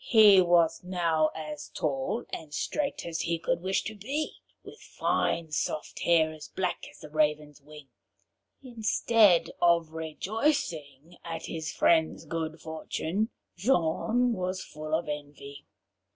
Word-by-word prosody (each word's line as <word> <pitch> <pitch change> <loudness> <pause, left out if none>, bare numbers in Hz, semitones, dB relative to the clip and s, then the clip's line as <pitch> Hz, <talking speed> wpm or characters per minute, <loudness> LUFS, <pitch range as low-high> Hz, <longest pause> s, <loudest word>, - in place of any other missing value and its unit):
He 210 -5 +7
was 170 -2 +3
now 170 -4 +1
as 150 -2 -6
tall 135 -5 -2
and 155 -2 -6
straight 290 -2 -2
as 165 -1 -3
he 170 0 0
could 170 +1 -1
wish 190 +1 0
to 220 - -5
be, 270 +9 -3 0.3
with - - -12
fine 165 -2 -1
soft 150 0 -3
hair 160 -2 +3
as 155 -1 -10
black 185 -1 -3
as - - -17
the 155 - -10
raven's 150 -1 0
wing. 150 0 -13 0.8
Instead 220 -5 +3
of 170 -2 +3
rejoicing 160 - -2
at 165 -1 -5
his 160 -2 -4
friend's 160 -1 +2
good 160 0 -4
fortune, 160 +6 -3 0.3
Jean 230 +4 +2
was 185 -2 -3
full 155 +1 -4
of 165 - -2
envy. 145 -1 -7
165 Hz, 135 wpm, -28 LUFS, 155-190 Hz, 0.8 s, He